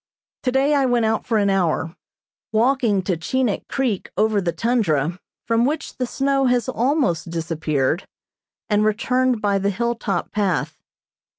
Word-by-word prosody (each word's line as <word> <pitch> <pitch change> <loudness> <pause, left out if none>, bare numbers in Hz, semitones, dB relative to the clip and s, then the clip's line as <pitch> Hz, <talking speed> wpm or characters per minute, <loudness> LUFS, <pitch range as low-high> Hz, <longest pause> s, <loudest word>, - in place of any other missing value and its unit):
Today 265 +3 +2
I 275 -2 +3
went 240 -2 +2
out 220 0 -1
for 225 - +2
an 200 -1 +2
hour, 175 -3 0 0.6
walking 225 -3 +2
to 185 -1 0
Chinik 225 +7 -1
Creek 250 -8 -1
over 215 0 +2
the 175 -2 0
tundra, 175 - 0 0.3
from 230 0 +2
which 300 +4 -2
the 250 - -1
snow 275 +1 +1
has 245 -2 +1
almost 240 - 0
disappeared, 160 -2 -1 0.6
and 210 0 +2
returned 250 +2 +1
by 200 -1 +2
the 200 +1 0
hill 235 +4 0
top 200 -6 -3
path. 200 -5 -1
220 Hz, 150 wpm, -21 LUFS, 185-250 Hz, 0.6 s, I